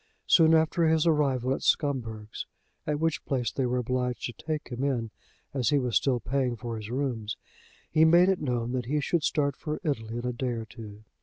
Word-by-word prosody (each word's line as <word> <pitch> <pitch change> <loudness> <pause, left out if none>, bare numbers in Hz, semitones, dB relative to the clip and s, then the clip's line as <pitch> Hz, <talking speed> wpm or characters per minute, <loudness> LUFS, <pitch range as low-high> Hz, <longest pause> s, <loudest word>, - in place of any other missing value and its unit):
Soon 165 -1 +6
after 160 +1 +3
his 160 0 +3
arrival 135 -5 +2
at - - -4
Scumberg's, 115 -7 -1 0.4
at 150 -1 0
which 160 -1 0
place 125 -5 -1
they 130 -2 -1
were 125 +1 0
obliged 125 -1 -1
to 120 - -4
take 155 +3 -4
him 125 +1 -4
in 120 -6 -1 0.4
as 130 -3 +1
he 145 - +3
was 125 -4 -1
still 130 -3 +2
paying 125 +1 -1
for 115 0 -5
his 105 0 -7
rooms, 120 -5 -2 0.5
he 160 0 +5
made 170 +3 +6
it 190 -1 +1
known 120 -4 -1
that 125 -2 -2
he 150 +3 +1
should 165 +3 0
start 145 -3 +1
for 150 +1 -4
Italy 115 -6 -2
in 120 - -4
a 125 - -1
day 125 +1 -2
or 115 -1 -4
two. 110 -2 -11
130 Hz, 210 wpm, -28 LUFS, 120-150 Hz, 0.5 s, Soon